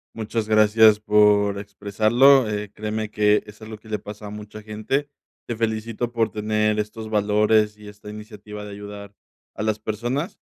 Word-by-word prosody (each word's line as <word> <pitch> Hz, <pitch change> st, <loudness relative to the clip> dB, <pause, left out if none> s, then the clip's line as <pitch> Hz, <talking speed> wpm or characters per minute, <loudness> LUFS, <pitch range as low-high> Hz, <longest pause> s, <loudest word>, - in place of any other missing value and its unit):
Muchas 110 Hz, 0 st, -3 dB
gracias 110 Hz, 0 st, +5 dB
por 105 Hz, -1 st, +3 dB
expresarlo, 110 Hz, +6 st, +3 dB
eh, 105 Hz, -1 st, -4 dB
créeme 110 Hz, 0 st, -4 dB
que 105 Hz, 0 st, +3 dB
es 105 Hz, +1 st, -14 dB
algo 110 Hz, 0 st, -8 dB
que 110 Hz, -, -17 dB
le 105 Hz, -, -1 dB
pasa 105 Hz, 0 st, -9 dB
a -, -, -7 dB
mucha 105 Hz, +1 st, -9 dB
gente. 110 Hz, +7 st, -3 dB, 0.4 s
Te 120 Hz, -, -3 dB
felicito 115 Hz, +1 st, -2 dB
por 115 Hz, -2 st, +1 dB
tener 105 Hz, 0 st, 0 dB
estos 110 Hz, +1 st, -5 dB
valores 105 Hz, 0 st, +2 dB
y 105 Hz, 0 st, -13 dB
esta 105 Hz, 0 st, -12 dB
iniciativa 105 Hz, -1 st, -9 dB
de 105 Hz, -, -8 dB
ayudar 100 Hz, 0 st, -9 dB, 0.4 s
a -, -, -5 dB
las 110 Hz, 0 st, -1 dB
personas, 120 Hz, -, -3 dB
105 Hz, 165 wpm, -23 LUFS, 105-110 Hz, 0.4 s, gracias